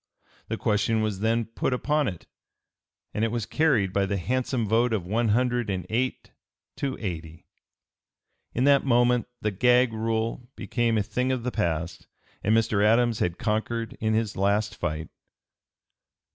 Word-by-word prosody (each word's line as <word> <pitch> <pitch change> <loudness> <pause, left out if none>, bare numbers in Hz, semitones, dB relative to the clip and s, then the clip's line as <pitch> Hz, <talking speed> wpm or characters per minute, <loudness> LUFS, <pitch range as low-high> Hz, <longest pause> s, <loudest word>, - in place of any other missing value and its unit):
The 115 - -3
question 110 0 +1
was 105 -3 -2
then 115 +2 +1
put 115 +3 -2
upon 150 +2 +1
it, 90 -4 -5 0.9
and 105 - -1
it - - +3
was 115 -1 -2
carried 120 - +2
by 100 0 +1
the 100 0 -1
handsome 125 +4 -1
vote 115 +3 +2
of 100 -6 -1
one 115 +5 0
hundred 120 0 +1
and 95 -2 -2
eight 125 +3 -1 0.5
to 135 -2 -2
eighty. 80 -5 -6 1.1
In 125 - 0
that 140 0 +5
moment 120 -1 +3
the 105 - 0
"gag" 125 +3 +3
rule 115 +2 -2
became 120 -2 0
a 105 - +2
thing 125 +5 -1
of 130 -3 -2
the 125 - -2
past, 85 -6 -2 0.4
and 110 +2 +3
Mr. 110 -2 +2
Adams 115 +1 +3
had 85 0 -1
conquered 115 +1 -2
in 110 0 +1
his 110 -2 -1
last 100 +1 +1
fight. 75 0 -3
110 Hz, 160 wpm, -26 LUFS, 100-120 Hz, 1.1 s, that